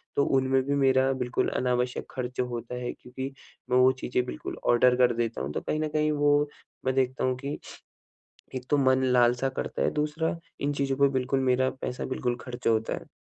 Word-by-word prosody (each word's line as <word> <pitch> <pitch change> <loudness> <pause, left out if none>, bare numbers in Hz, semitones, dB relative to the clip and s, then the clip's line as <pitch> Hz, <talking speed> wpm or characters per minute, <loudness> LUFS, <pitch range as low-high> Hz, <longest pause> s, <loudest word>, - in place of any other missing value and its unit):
तो 140 - +3
उनमें 130 0 +2
भी 140 +2 0
मेरा 135 -1 +3
बिल्कुल 125 -1 -1
अनावश्यक 125 0 0
खर्च 125 -1 -5
होता 120 -1 -3
है 120 - -2
क्योंकि 130 +2 -7 0.4
मैं 125 - +3
वो 130 +1 +6
चीज़ें 125 0 0
बिल्कुल 125 - -6
ऑर्डर 125 +1 +5
कर 125 -1 +4
देता 115 - -2
हूँ। 70 +2 -3
तो - - -2
कहीं 155 - -2
न 155 - 0
कहीं 155 0 +1
वो, 145 0 +3 0.4
मैं 130 0 +1
देखता 130 -1 +1
हूँ 130 0 +2
कि, 140 +3 -4 1.0
एक 125 -1 -4
तो 145 - +3
मन 130 -1 +3
लालसा 125 0 +3
करता 130 - -4
है, - - +2
दूसरा 155 +2 -1 0.2
इन 145 +1 0
चीज़ों 140 -1 -1
पे 140 0 +5
बिल्कुल 130 +1 0
मेरा 130 0 +2
पैसा, 130 -1 -5
बिल्कुल 125 -2 -1
खर्च 125 -1 -5
होता 110 -1 +2
है। - - -7
130 Hz, 200 wpm, -27 LUFS, 125-140 Hz, 1.0 s, वो